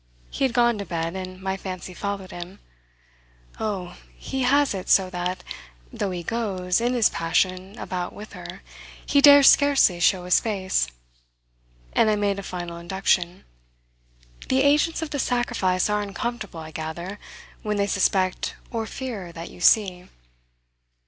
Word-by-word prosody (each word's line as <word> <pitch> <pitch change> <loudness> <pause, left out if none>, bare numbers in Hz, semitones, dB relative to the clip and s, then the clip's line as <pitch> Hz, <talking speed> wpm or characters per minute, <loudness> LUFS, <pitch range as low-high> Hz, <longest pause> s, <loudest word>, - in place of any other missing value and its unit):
He 275 - 0
had 255 - -1
gone 240 -2 +3
to - - -2
bed, 165 0 -3
and 185 -1 -6
my 190 0 -2
fancy 185 -1 -7
followed 200 -1 -4
him. 175 +3 -8 1.0
"Oh, 190 -5 -4 0.2
he 265 -1 -4
has 280 +1 +3
it 190 -2 -6
so 185 -1 +4
that, 180 0 -3 0.5
though 200 - -2
he 180 -2 -4
goes, 190 -3 -1
in 245 +1 +1
his 230 -3 +5
passion, 185 +4 -1
about 180 -1 -4
with 210 0 -11
her, 180 +1 -9 0.4
he 285 - +3
dares 285 -1 +9
scarcely 280 -11 +4
show 180 +1 +3
his 180 - +4
face." 195 - 0 1.1
And 220 - +4
I 215 - +3
made 200 -1 0
a - - -4
final 175 -3 -6
induction. 180 0 0 1.1
"The 265 +1 +3
agents 300 +3 +3
of 315 - -6
the 285 - -2
sacrifice 235 -8 +1
are 210 0 0
uncomfortable, 205 -3 -5
I 160 0 -9
gather, 170 +6 -6 0.4
when 210 -1 -2
they 200 - +2
suspect 190 -2 0 0.2
or 225 -2 -3
fear 220 -11 -6
that 165 0 -8
you - - -13
see." 185 -2 +3
195 Hz, 155 wpm, -24 LUFS, 180-230 Hz, 1.1 s, dares